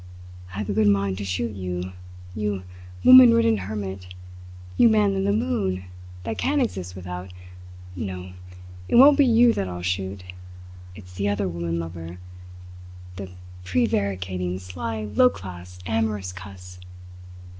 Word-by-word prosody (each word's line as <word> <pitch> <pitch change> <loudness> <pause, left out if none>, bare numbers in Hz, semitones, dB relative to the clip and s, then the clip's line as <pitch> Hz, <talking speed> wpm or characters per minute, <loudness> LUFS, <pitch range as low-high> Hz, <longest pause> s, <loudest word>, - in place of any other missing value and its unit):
"I 95 - -9
have 105 -1 -3
a - - -1
good 105 0 +3
mind 100 -1 +1
to - - -3
shoot 100 +4 -2
you, 90 -1 -4 0.4
you 105 -2 -2 0.4
woman 125 -2 +9
ridden 115 -1 +3
hermit, 95 -2 -5 0.7
you 230 - +6
man 210 -2 +3
in 195 0 -1
the 200 - +2
moon, 210 - -1 0.4
that 110 +3 -4
can't 290 +2 +1
exist 90 - -3
without 90 0 -7 0.6
no, 90 -1 -6 0.5
it - - 0
won't 275 +4 +8
be 280 -2 +4
you 235 0 +5
that 95 - -2
I'll 90 -1 -6
shoot. 95 +1 -3 0.7
It's 90 -2 -13
the 100 +2 -1
other 100 -1 -1
woman 85 -1 -3
lover 85 +1 -6 1.0
the 95 -1 -6 0.3
prevaricating, 95 -3 -1
sly, 95 +5 -5
low 105 +4 +4
class, 90 -2 -10
amorous 105 -4 -1
cuss! 90 -1 -11
95 Hz, 140 wpm, -24 LUFS, 90-110 Hz, 1.0 s, woman